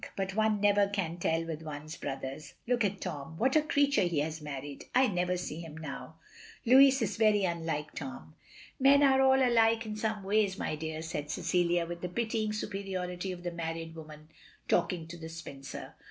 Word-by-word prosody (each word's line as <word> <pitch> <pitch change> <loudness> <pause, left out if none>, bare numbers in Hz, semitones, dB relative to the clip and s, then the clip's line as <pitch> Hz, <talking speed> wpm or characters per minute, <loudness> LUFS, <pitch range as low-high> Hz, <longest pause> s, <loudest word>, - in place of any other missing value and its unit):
But 190 -1 -2
one 215 -1 +2
never 205 0 +4
can 190 -5 -2
tell 165 0 0
with 160 -1 -5
one's 155 0 -7
brothers. 135 +1 -6
Look 240 -1 +1
at 200 -1 -1
Tom. 150 +2 -5
What 260 - +2
a 310 - +6
creature 285 -1 +2
he 175 -4 0
has 160 +1 -3
married. 145 -1 -7
I 260 +1 +6
never 180 -4 0
see 165 -3 -5
him 160 -2 -8
now. 160 +1 -7 0.2
" - - -18
"Louis 265 +2 +7
is 210 -1 -2
very 215 -2 +4
unlike 165 -4 -2
Tom." 105 - -7 0.5
"Men 280 +2 +6
are 265 -1 +5
all 265 -1 +5
alike 230 -1 +3
in 215 -1 -4
some 215 -1 -2
ways, 200 -1 +2
my 155 - -2
dear," 160 +1 -5
said 150 -2 -4
Cecilia, 175 +1 +1
with 170 0 -6
the 180 - -3
pitying 220 +2 -1
superiority 190 -3 -3
of 175 -1 -8
the 175 - -2
married 165 -1 -4
woman 155 -1 -11 0.4
talking 170 -1 +1
to 170 +1 -8
the 160 -1 -8
spinster. 140 -4 -8
175 Hz, 190 wpm, -31 LUFS, 160-215 Hz, 0.5 s, Louis